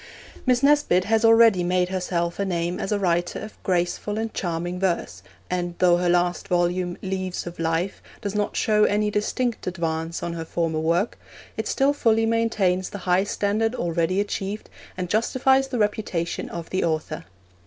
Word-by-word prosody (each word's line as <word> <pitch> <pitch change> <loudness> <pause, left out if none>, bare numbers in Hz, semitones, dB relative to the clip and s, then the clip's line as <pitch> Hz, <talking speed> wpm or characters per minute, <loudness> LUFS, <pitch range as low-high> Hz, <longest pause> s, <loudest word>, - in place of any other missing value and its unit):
Miss 250 0 +3
Nesbit 285 -11 +4
has 220 +3 +1
already 225 -5 +6
made 180 0 +1
herself 175 -2 -2
a - - +2
name 175 -2 -1
as - - -3
a 210 - +2
writer 175 -2 0
of 215 - -9
graceful 185 +3 -1
and 225 0 -3
charming 175 0 -3
verse, 170 - -1 0.3
and 175 -1 -2
though 175 -1 +4
her 175 0 +1
last 175 0 +1
volume, 175 0 0
Leaves 185 -1 -3
of 175 -1 -8
Life, 165 +3 -1 0.2
does 200 -3 -4
not 210 -1 -1
show 210 -1 +3
any 210 +1 +1
distinct 230 +3 -1
advance 165 -2 -2
on 170 - -3
her 165 -1 -4
former 165 -1 -1
work, 170 +7 0 0.4
it - - -3
still 275 +1 +2
fully 225 -5 +2
maintains 215 -5 +1
the - - -6
high 180 +1 +3
standard 210 +3 0
already 170 +1 0
achieved, 205 0 -3 0.3
and 180 -1 -2
justifies 260 +6 +2
the 260 -2 -3
reputation 205 -5 -1
of 170 -1 -7
the 185 - 0
author. 155 -1 -2
185 Hz, 170 wpm, -24 LUFS, 175-215 Hz, 0.4 s, already